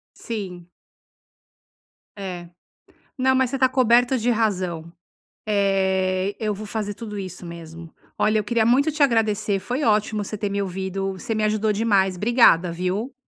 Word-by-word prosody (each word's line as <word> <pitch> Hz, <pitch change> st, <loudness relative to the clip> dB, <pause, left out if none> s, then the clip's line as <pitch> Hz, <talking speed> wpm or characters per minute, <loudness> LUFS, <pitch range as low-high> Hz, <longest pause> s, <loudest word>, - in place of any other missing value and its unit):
Sim. 185 Hz, -6 st, -6 dB, 1.5 s
É, 180 Hz, -3 st, -6 dB, 0.7 s
não, 260 Hz, -1 st, +2 dB
mas 260 Hz, -2 st, +2 dB
você 270 Hz, -, -2 dB
está 260 Hz, -1 st, +3 dB
coberto 250 Hz, 0 st, +3 dB
de 240 Hz, +2 st, 0 dB
razão, 185 Hz, -7 st, -1 dB, 0.6 s
eh, 190 Hz, -1 st, +1 dB
eu 215 Hz, -1 st, -1 dB
vou 215 Hz, +2 st, -7 dB
fazer 210 Hz, -1 st, -3 dB
tudo 210 Hz, -2 st, -7 dB
isso 185 Hz, -2 st, -7 dB
mesmo. 165 Hz, -1 st, -10 dB, 0.2 s
Olha, 215 Hz, 0 st, +2 dB
eu -, -, -2 dB
queria 225 Hz, +1 st, +1 dB
muito 275 Hz, +7 st, +3 dB
te 300 Hz, 0 st, +2 dB
agradecer, 215 Hz, -5 st, +1 dB
foi 245 Hz, +9 st, -3 dB
ótimo 215 Hz, -2 st, +1 dB
você 215 Hz, -, -6 dB
ter 205 Hz, 0 st, -2 dB
me 200 Hz, 0 st, -2 dB
ouvido, 195 Hz, +1 st, -3 dB
você 215 Hz, +4 st, -4 dB
me 215 Hz, -, 0 dB
ajudou 215 Hz, 0 st, +1 dB
demais, 200 Hz, -3 st, +2 dB
obrigada, 195 Hz, -5 st, +4 dB
viu. 185 Hz, +9 st, -3 dB
205 Hz, 155 wpm, -23 LUFS, 190-230 Hz, 1.5 s, obrigada